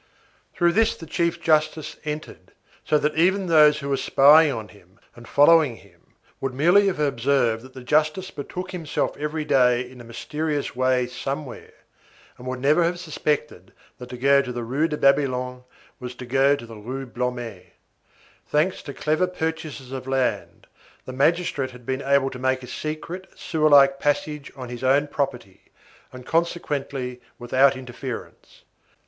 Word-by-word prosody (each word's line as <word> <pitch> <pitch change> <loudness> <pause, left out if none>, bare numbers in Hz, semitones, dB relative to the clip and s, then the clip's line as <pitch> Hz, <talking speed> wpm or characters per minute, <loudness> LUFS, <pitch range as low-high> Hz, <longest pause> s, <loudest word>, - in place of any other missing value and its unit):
Through 175 0 +3
this 225 +4 +2
the 165 - -10
chief 170 +1 -1
justice 155 -1 +1
entered, 155 0 -7 0.3
so 150 - +2
that 150 +1 0
even 190 +4 +2
those 150 -3 +5
who 140 - -5
were 135 - +1
spying 145 +4 +6
on 110 -4 -6
him 95 0 -21 0.2
and 120 -1 -13
following 145 -3 +5
him 90 -5 -22 0.2
would 135 -1 -3
merely 175 +8 +4
have 195 - 0
observed 135 -4 +1
that 130 0 -15
the 130 - -9
justice 155 +7 +1
betook 180 +6 -6
himself 165 -5 -2
every 150 +1 -3
day 125 -3 +3
in 125 -1 -13
a - - -11
mysterious 150 +5 -4
way 130 0 +2
somewhere, 135 +2 -6 0.7
and 125 - -9
would 130 0 -3
never 150 +6 +3
have 175 +1 0
suspected 150 - -3 0.3
that 125 0 -9
to 125 - -7
go 140 +2 +4
to 130 -2 -6
the 120 -1 -4
Rue 135 +8 0
de 150 - -3
Babylone 130 -3 +1 0.3
was 125 0 -7
to 125 - -8
go 135 +3 +3
to 140 - -9
the 115 -1 -11
Rue 130 +6 -6
Blomet. 120 -7 -5 0.7
Thanks 155 +5 0
to 140 - -9
clever 155 +4 +1
purchasers 160 -6 -5
of 130 -1 -6
land, 135 -1 -2 0.4
the 130 - -7
magistrate 145 -1 +1
had 125 -1 -14
been 130 +2 -2
able 140 -1 +2
to 125 - -8
make 130 0 0
a - - -9
secret, 165 +7 -6
sewer 155 -2 0
like 135 -1 +6
passage 145 0 -1
on 130 -3 -8
his 120 +1 -7
own 140 +3 +3
property, 125 -10 -4 0.5
and 125 -1 -11
consequently, 140 -6 -2 0.2
without 130 +3 +3
interference. 125 -1 -9
140 Hz, 165 wpm, -23 LUFS, 125-155 Hz, 0.7 s, spying